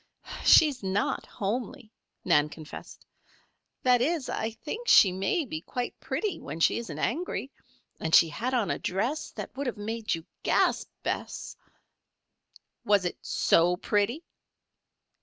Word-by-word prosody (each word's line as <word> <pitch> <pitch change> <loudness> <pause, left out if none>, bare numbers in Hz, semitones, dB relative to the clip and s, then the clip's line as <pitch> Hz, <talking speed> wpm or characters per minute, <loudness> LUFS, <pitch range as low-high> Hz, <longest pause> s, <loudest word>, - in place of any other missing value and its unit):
"She 320 - +8
is 275 -4 -5
not 195 +1 -1
homely," 220 +2 -4 0.3
Nan 150 +1 +4
confessed. 155 0 -11 0.8
"That 250 -1 +4
is, 305 0 0
I 220 - -1
think 435 - -7
she 190 - +7
may 195 - 0
be 155 -10 -5
quite 245 +7 -5
pretty 415 -5 -3
when 160 - -7
she 165 - +3
isn't 235 - -7
angry. 280 -1 -2 0.5
And 160 - +2
she 165 - +7
had 245 - -2
on 230 -5 +1
a - - -2
dress 230 +12 -2
that - - -7
would 280 0 -3
have 245 - -3
made 220 0 -2
you 165 0 -9 0.2
gasp, - - +1
Bess." - - -4 1.3
"Was 205 -3 +3
it 175 - -3
so 175 +2 +3
pretty?" 210 - 0
225 Hz, 140 wpm, -28 LUFS, 185-260 Hz, 1.3 s, She